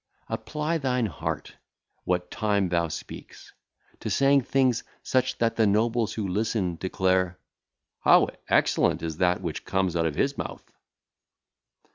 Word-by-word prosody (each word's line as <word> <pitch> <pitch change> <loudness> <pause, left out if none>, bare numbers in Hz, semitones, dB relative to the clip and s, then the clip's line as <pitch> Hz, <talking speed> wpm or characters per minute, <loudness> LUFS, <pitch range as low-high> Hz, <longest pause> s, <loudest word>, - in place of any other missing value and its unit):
Apply 150 +9 -2
thine 125 -4 0
heart, 90 -10 -5 0.5
what 90 0 -1
time 100 -3 +1
thou 85 -1 +1
speakest, 80 - -9 0.5
to - - -4
saying 140 0 +4
things 130 -2 +1 0.2
such 130 -1 +1
that 115 -1 0
the 110 -2 +4
nobles 115 +2 +1
who 105 -3 -2
listen 95 -2 -1
declare, 95 -1 0 0.6
'How - - +5 0.2
excellent - - +2
is 80 -2 -3
that 90 0 +2
which 85 -4 -4
cometh 95 -2 0
out 80 -1 +2
of 75 - -3
his - - 0
mouth!' - - -7
100 Hz, 135 wpm, -26 LUFS, 90-120 Hz, 0.6 s, How